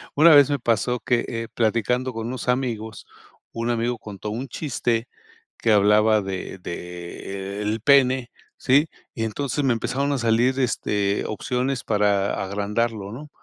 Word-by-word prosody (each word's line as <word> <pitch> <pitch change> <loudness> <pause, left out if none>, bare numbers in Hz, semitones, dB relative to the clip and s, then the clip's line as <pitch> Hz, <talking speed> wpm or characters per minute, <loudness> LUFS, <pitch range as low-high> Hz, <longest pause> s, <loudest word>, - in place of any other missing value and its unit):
Una 160 +3 +7
vez 145 -2 +7
me 145 -2 0
pasó 120 +1 0
que, 120 -2 +1
eh, 115 -1 -4
platicando 120 +3 0
con 115 0 -4
unos 125 0 -5
amigos, 115 -4 -2 0.5
un 115 +1 -3
amigo 120 +1 0
contó 105 -1 -7
un 120 +6 -4
chiste 120 -4 -2 0.5
que 115 - +1
hablaba 105 +1 +4
de 95 -1 -5
de, 90 +3 -6
e - - -3
el 105 +1 -2
pene, 130 -2 +4 0.3
¿sí?, 145 +5 +3 0.3
y 115 - -2
entonces 140 +5 -2
me 125 - +3
empezaron 140 +5 -1
a 140 - 0
salir, 120 +3 +2
este, 105 -4 0
opciones 125 +4 -2
para 100 -2 +1
agrandarlo, 105 +1 -2
¿no?, 145 +6 -9
115 Hz, 150 wpm, -23 LUFS, 105-125 Hz, 0.5 s, Una